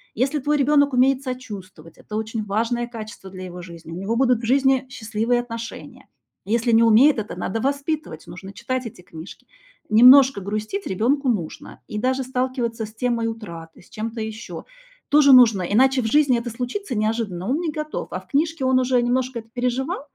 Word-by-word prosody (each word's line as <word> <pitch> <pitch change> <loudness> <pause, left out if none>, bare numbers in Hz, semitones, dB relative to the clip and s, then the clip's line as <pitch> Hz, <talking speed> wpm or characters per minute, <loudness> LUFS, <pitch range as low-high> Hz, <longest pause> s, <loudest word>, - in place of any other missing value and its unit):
если 270 +6 0
твой 295 +2 0
ребёнок 285 0 +3
умеет 265 +1 +3
сочувствовать- 205 - -8
это 210 - -9
очень 220 0 -3
важное 230 +4 -1
качество 215 -4 -9
для 185 0 -9
его 180 0 -8
жизни, 170 -2 -11
у - - -6
него 220 +4 -1
будут 250 -2 +2
в - - -5
жизни 265 +1 +2
счастливые 230 0 -1
отношения. 230 -1 -9 0.4
Если 230 +2 +1
не 230 +1 +6
умеет, 230 +4 +5
это 210 - -6
надо 220 +4 -3
воспитывать, 280 - -3
нужно 190 +2 -10
читать 245 +4 -4
эти 205 -5 -9
книжки. 165 0 -12 0.4
Немножко 250 +1 +7
грустить 215 - -4
ребёнку 255 +8 0
нужно. 180 -9 -4
И 210 - -6
даже 260 +4 0
сталкиваться 250 -3 -2
с 215 - -13
темой 230 -1 -1
утраты, 170 -8 -9
с - - -22
чем-то 225 +1 -5
ещё 220 +1 -7 0.4
тоже 285 -1 +6
нужно. 230 -7 +7
Иначе 260 +7 +3
в - - -5
жизни 265 0 +3
это 240 0 -5
случится 250 - -4
неожиданно, 215 -3 -2
он 290 +5 +1
не 325 -3 -2
готов, 305 0 -5
а - - -3
в - - -20
книжке 310 -1 0
он 260 0 +3
уже 250 -1 +2
немножко 250 0 -1
это 225 - -13
переживал, 250 +2 -2
235 Hz, 180 wpm, -22 LUFS, 215-260 Hz, 0.4 s, Немножко